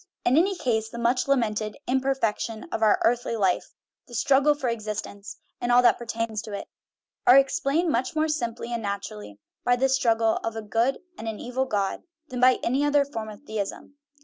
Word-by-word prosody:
In 250 - +4
any 380 +5 +3
case, 220 -6 -1
the 235 - -9
much 240 +3 +1
lamented 215 -5 0
" - - -53
imperfection 255 -4 -1
of - - -3
our 215 -2 +4
earthly 240 0 +1
life," 190 -4 0 0.3
the 240 - -10
"struggle 280 +5 +4
for 275 -3 -3
existence," 215 -3 -5 0.2
and 245 - 0
all 245 +1 +6
that 240 - +5
pertains 230 -2 -3
to 215 -1 -9
it, 200 - -5 0.6
are 250 - +9
explained 275 +4 +2
much 255 +6 -1
more 310 0 +2
simply 240 -6 -3
and 235 - -2
naturally 105 - -5 0.3
by 245 - +3
this 265 +1 +2
struggle 225 -3 +2
of 225 0 -4
a 225 - -5
good 230 +6 +1 0.2
and 225 - -6
an 220 -2 -4
evil 255 +2 -2
god 200 -5 -1 0.3
than 250 - -5
by 255 0 +6
any 265 +4 +1
other 290 -1 +3
form 225 -6 -6
of 210 - -11
theism. 215 +1 -5
235 Hz, 195 wpm, -26 LUFS, 220-265 Hz, 0.6 s, are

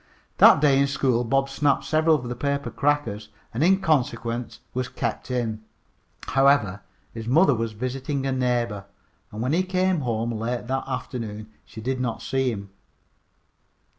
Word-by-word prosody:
That - - +8
day 140 -3 +4
in 140 - +3
school 130 -3 +1
Bob 135 +3 +1
snapped 140 +1 +1
several 160 +1 +3
of 125 -5 -4
the 120 - -4
paper 140 +2 -2
crackers, 140 -8 -1 0.2
and 115 - -2
in 190 +3 +4
consequence 120 -6 -1
was 130 0 -2
kept - - -4
in. 115 -4 -2 0.7
However, 135 -8 +3 0.3
his 115 -1 -7
mother 145 +4 +5
was 115 -1 -2
visiting 130 +4 -3
a 135 - 0
neighbor, 120 -6 -1 0.5
and 110 +2 -4
when 130 +4 0
he 175 - +3
came 185 -1 +1
home 120 -3 -1
late 115 +2 -3
that 130 +2 -2
afternoon 110 -5 -5
she 110 - -10
did 130 +2 -2
not 120 -3 -3
see 130 +1 0
him. 100 -4 -6
125 Hz, 160 wpm, -24 LUFS, 115-140 Hz, 0.7 s, That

